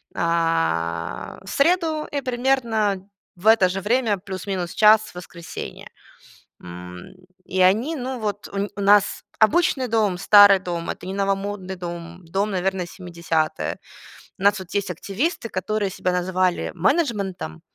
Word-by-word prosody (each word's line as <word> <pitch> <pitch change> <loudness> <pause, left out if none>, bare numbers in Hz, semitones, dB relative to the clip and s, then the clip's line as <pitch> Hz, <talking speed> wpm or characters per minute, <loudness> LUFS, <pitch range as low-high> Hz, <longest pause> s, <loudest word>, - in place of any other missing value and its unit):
а, 85 - -1
в 195 - -10
среду 320 0 +1
и 285 - -1
примерно 235 -6 0 0.3
в 180 +4 -5
это 220 -4 +6
же 190 +1 -3
время, 225 0 +1
плюс-минус 190 -2 -4
час, 215 0 +7
в 215 - -12
воскресенье. 170 -1 -8 0.8
М, 90 - -10 0.3
и 185 - -3
они, 215 - +3
ну, 255 -1 -4
вот, 205 -2 -4
у 200 - -3
нь 200 +1 -1
у - - -5
нас 205 0 +4 0.2
обычный 260 +2 +3
дом, 215 -5 +1
старый 200 0 +7
дом, 170 -2 -4
это - - -7
не 190 - -4
новомодный 195 -1 -3
дом. 175 0 -8
Дом, 195 +5 -1
наверное, 190 -1 -1
70-я. 170 -3 -2 0.6
У 195 - -7
нас, 200 0 +4
вот, 185 -1 -10
есть 200 -2 0
активисты, 225 - -3
которые 205 +2 -2
себя 185 0 -2
называли 180 0 0
менеджментом, 195 - -1
195 Hz, 140 wpm, -23 LUFS, 175-215 Hz, 0.8 s, час